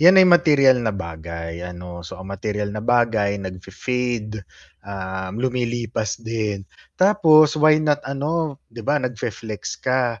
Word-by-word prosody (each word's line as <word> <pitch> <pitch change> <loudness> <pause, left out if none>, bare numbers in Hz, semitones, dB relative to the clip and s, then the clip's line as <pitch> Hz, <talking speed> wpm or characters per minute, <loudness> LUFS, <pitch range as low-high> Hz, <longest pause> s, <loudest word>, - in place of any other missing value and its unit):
'yan 180 +4 +8
ay 185 - +7
materyal 145 -6 +6
na 110 - 0
bagay 85 -1 -6
ano. 90 -1 -8
So, 90 - -9
ang 95 - -9
materyal 105 +1 -3
na 110 0 -5
bagay 115 -4 +2
nagfe-fade, 110 +4 -4 0.4
ah, 95 -1 -5
lumilipas 120 -2 -2
din. 110 -3 -3 0.4
Tapos 160 -6 +6
why 155 0 +5
not 150 -1 +1
ano, 145 +1 -2
'di 115 0 -10
ba, 145 +3 +2
nagfe-flex 115 -3 -5
ka, 125 -4 0
115 Hz, 135 wpm, -22 LUFS, 100-140 Hz, 0.4 s, yan